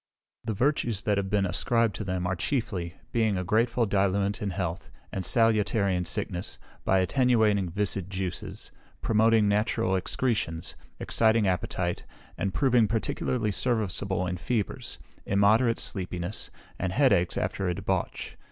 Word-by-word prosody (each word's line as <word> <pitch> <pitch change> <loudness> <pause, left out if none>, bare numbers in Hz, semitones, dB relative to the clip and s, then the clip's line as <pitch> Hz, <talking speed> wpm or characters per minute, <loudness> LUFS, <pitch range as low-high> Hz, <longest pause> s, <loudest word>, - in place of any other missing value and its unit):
The 110 -2 -3
virtues 120 -4 0
that 105 -1 +1
have 95 -1 -3
been 100 -1 +2
ascribed 115 +4 +1
to - - -4
them 90 -2 -2
are 90 +1 0
chiefly, 90 - -2 0.2
being 110 -4 +1
a 90 - -1
greatful 115 +5 +2
diluent 100 0 +1
in 105 - -1
health, 90 -1 -4 0.2
and 95 - -3
salutary 105 -3 +3
in 90 0 -1
sickness, 90 +2 -1 0.3
by 95 - +3
attenuating 105 -2 +2
viscid 100 0 -1
juices, 95 -2 -4 0.3
promoting 110 -1 +3
natural 100 -2 +1
excretions, 95 -5 -1 0.2
exciting 110 -2 +3
appetite, 90 -1 -1 0.3
and 95 - -2
proving 125 -2 +3
particularly 110 +1 -1
serviceable 100 -4 -1
in 90 0 -3
fevers, 105 +4 -2 0.3
immoderate 110 +4 +3
sleepiness, 90 0 -2 0.3
and 95 -1 -2
head 135 -2 +4
aches 90 -3 +1
after 95 - -1
a 90 - -1
debauch. - - -3
100 Hz, 140 wpm, -27 LUFS, 95-115 Hz, 0.3 s, head